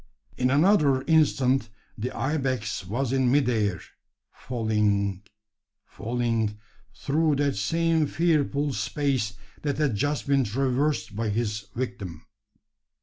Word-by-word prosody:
In 125 - +1
another 145 -3 +4
instant 135 -6 +2 0.3
the 115 +4 -3
ibex 130 -9 -2
was 125 +5 -1
in 130 -2 +2
mid 140 -2 +3
air 105 -7 +1 0.5
falling 105 -5 0 0.6
falling 115 -2 -2 0.4
through 155 +1 +1
that 140 0 +1
same 160 +9 +1
fearful 150 -4 +1
space 135 -9 -1 0.3
that 145 -3 -1
had 150 -5 +1
just 145 +7 -1
been 140 -1 +3
traversed 130 +2 0
by 110 0 -1
his 105 -1 -2
own - - -6
victim. 100 -10 -5
130 Hz, 115 wpm, -26 LUFS, 110-145 Hz, 0.6 s, another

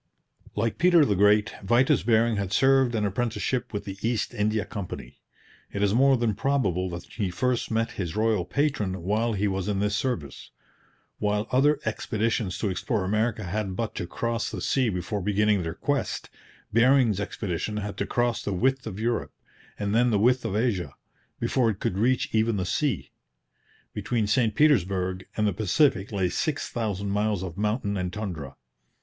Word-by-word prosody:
Like 115 +2 -1
Peter 175 -3 +6
the 105 - +2
Great, 105 +2 +4
Vitus 120 +3 +3
Bering 115 +1 +2
had 100 -2 -2
served 135 +1 +4
an 105 -2 +1
apprenticeship 115 +3 -1
with 100 -1 -4
the 95 -1 -7
East 115 -1 -1
India 105 0 0
Company. 90 - -7 0.5
It 100 - -2
is 100 -1 +2
more 135 +2 +5
than 115 -2 +1
probable 100 -7 0
that 85 0 -6
he 100 -5 -3
first 125 +6 -1
met 115 0 0
his 90 -2 -4
royal 110 -3 +2
patron 105 - -1
while 110 +5 +1
he 105 0 0
was 95 -1 -2
in 105 -2 0
this 105 +1 0
service. 105 - -3 0.7
While 105 +1 0
other 140 +3 +3
expeditions 110 -2 -1
to 105 - -1
explore 95 +3 -1
America 110 +2 0
had 95 +1 -3
but 115 +2 -3
to 90 - -4
cross 115 +4 -2
the 105 - -5
sea 130 +6 +1
before 100 +2 -3
beginning 105 +1 +2
their 80 0 -4
quest, 145 -3 -2 0.4
Bering's 120 -3 +4
expedition 105 0 -3
had 105 -1 -4
to - - -2
cross 120 -1 0
the 100 - -2
width 130 +6 +1
of 100 -2 -6
Europe, 115 +1 -1 0.4
and 100 0 -2
then 120 +2 +4
the 110 - +2
width 125 +4 +3
of 105 -3 -2
Asia, 105 -6 -1 0.4
before 125 -4 +2
it 105 - -3
could 95 - -1
reach 125 +3 +2
even 110 0 +2
the 95 - -1
sea. 115 - -1 0.8
Between 115 -3 -1
St 110 0 +1
Petersburg 95 - +2
and 105 - +2
the 105 - +1
Pacific 105 - +2
lay 95 -3 +1
six 145 - -2
thousand 100 -4 -2
miles 105 -2 0
of 90 -3 -6
mountain 105 0 -1
and 90 -1 -2
tundra. 90 -10 -5
105 Hz, 175 wpm, -26 LUFS, 100-120 Hz, 0.8 s, Peter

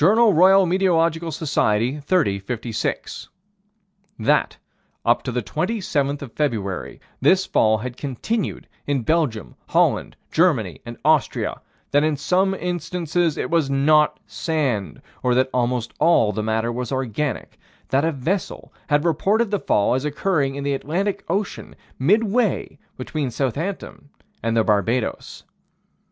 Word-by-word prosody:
Roy. 195 -1 +6
Met. 180 +2 0 0.3
Soc._, 145 -6 -1
30 145 - +1
56: 115 +2 -4 0.9
That, - - +1 0.5
up - - +3
to - - -4
the - - -2
27th 145 -11 -1
of 125 - -10
February, 110 -11 -2 0.2
this 185 +8 +4
fall 110 0 +3
had 125 +3 -6
continued 150 - -3 0.2
in 140 -4 0
Belgium, 130 - 0
Holland, - - +1 0.2
Germany 130 - +1
and 120 - -7
Austria; 155 -2 +1 0.3
that 145 +1 +4
in 155 -1 +1
some 190 +6 +1
instances 175 -2 -1
it - - -3
was 165 -5 +2
not 150 +2 +3
sand, 140 - -2 0.2
or 125 -1 +2
that 130 +1 +2
almost 125 -2 -1
all 140 -11 +4
the 110 - -3
matter 110 +2 0
was 125 +1 -4
organic: 130 0 -3 0.3
that 135 +2 +2
a 165 - +2
vessel 165 +7 -3
had 145 +1 +2
reported 200 +7 +1
the 205 - +1
fall 105 -8 +2
as 130 +2 0
occurring 150 -2 0
in 140 - -4
the 140 0 0
Atlantic 185 +9 -2
Ocean, 195 +3 -3 0.2
midway 210 - +1 0.2
between 140 +1 -3
Southampton 145 - -4 0.3
and 115 0 0
the 110 - +4
Barbados. 110 +3 -1
145 Hz, 130 wpm, -22 LUFS, 125-175 Hz, 0.9 s, Roy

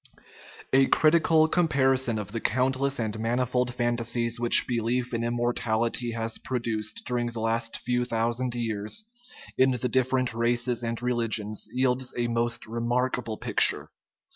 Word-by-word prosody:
A 135 0 +5
critical 160 0 +4
comparison 135 -8 +2
of 105 -1 -5
the 115 - -3
countless 130 +3 0
and 110 -1 -3
manifold 125 +2 0
fantasies 120 -1 -1
which 120 -1 +5
belief 120 +1 -1
in 115 0 -1
immortality 120 0 -1
has 115 0 -3
produced 115 -4 -3
during 120 -1 -1
the 120 -1 -5
last 115 +1 -1
few 125 0 -1
thousand 120 +1 -1
years 115 - -3 0.5
in 130 +1 +5
the 125 -1 -1
different 130 -1 +1
races 120 +1 0
and 115 0 -3
religions 115 -4 0
yields 130 0 0
a 120 - 0
most 115 0 -1
remarkable 120 0 -2
picture. - - +2
120 Hz, 135 wpm, -26 LUFS, 115-125 Hz, 0.5 s, A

